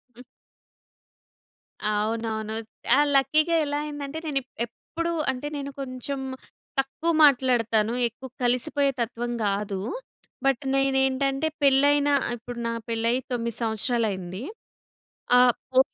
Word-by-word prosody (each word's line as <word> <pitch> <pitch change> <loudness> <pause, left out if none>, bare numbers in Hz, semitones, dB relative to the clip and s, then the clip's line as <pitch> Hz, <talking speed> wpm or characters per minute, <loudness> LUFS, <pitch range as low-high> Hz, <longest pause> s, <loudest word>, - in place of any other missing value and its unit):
హ్మ్. 250 - -12 1.7
అవునవును. 220 0 -1 0.4
ఆ! - - +5 0.2
లక్కీగా 310 +5 +3
ఎలా 290 0 -1
అయ్యిందంటే 290 0 -5
నేనిప్ 275 -4 -2 0.2
ఎప్పుడూ 335 +8 -5 0.2
అంటే 260 +3 -5
నేను 280 0 -5
కొంచెం 265 +1 -4 0.6
తక్కువ 270 +5 0
మాట్లాడతాను. 235 -5 +3
ఎక్కువ 250 +3 -10
కలిసిపోయే 275 +3 +2
తత్వం 240 +1 -2
గాదు. 200 -1 -1 0.7
బట్ 270 0 +2
నేనేంటంటే 270 +1 +2
పెళ్ళైన 285 +1 +4 0.3
ఇప్పుడు 240 +1 -8
నా - - -1 0.2
పెళ్ళయ్యి 230 +2 +1
9 235 -2 -2
సంవత్సరాలయింది. 220 -5 -1 1.0
ఆ! - - +8 0.3
పో 260 - +5
255 Hz, 100 wpm, -26 LUFS, 230-280 Hz, 1.7 s, ఆ